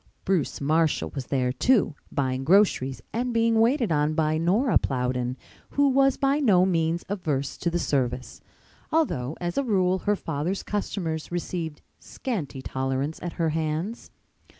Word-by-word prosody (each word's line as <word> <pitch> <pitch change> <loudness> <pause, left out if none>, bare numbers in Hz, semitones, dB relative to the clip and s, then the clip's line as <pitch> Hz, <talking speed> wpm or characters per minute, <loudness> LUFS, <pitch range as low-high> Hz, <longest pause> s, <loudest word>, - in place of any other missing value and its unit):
Bruce 185 -7 0
Marshall 155 +2 +1
was 135 -3 -5
there, 130 -2 +1
too, 215 - +2 0.2
buying 130 -1 -1
groceries 155 -6 +3
and 245 +2 -1
being 230 -1 +3
waited 235 - +3
on 150 0 +1
by 155 -1 +2
Nora 200 +9 +3
Plowden, 125 -1 -1 0.3
who 285 0 +3
was 270 0 +3
by 275 +1 +2
no 195 -10 +4
means 165 -2 0
averse 150 -9 -2
to 170 - -1
the 170 - -1
service, 130 -5 -2 0.5
although 160 - 0
as 175 +4 -1
a - - +1
rule 190 -6 +2
her 205 +2 +1
father's 165 +2 -3
customers 170 -6 -3
received 170 -3 -4 0.2
scanty 155 - -5
tolerance 135 +4 -2
at 175 - -4
her 165 -2 0
hands. 160 +7 -3
165 Hz, 150 wpm, -26 LUFS, 140-210 Hz, 0.5 s, no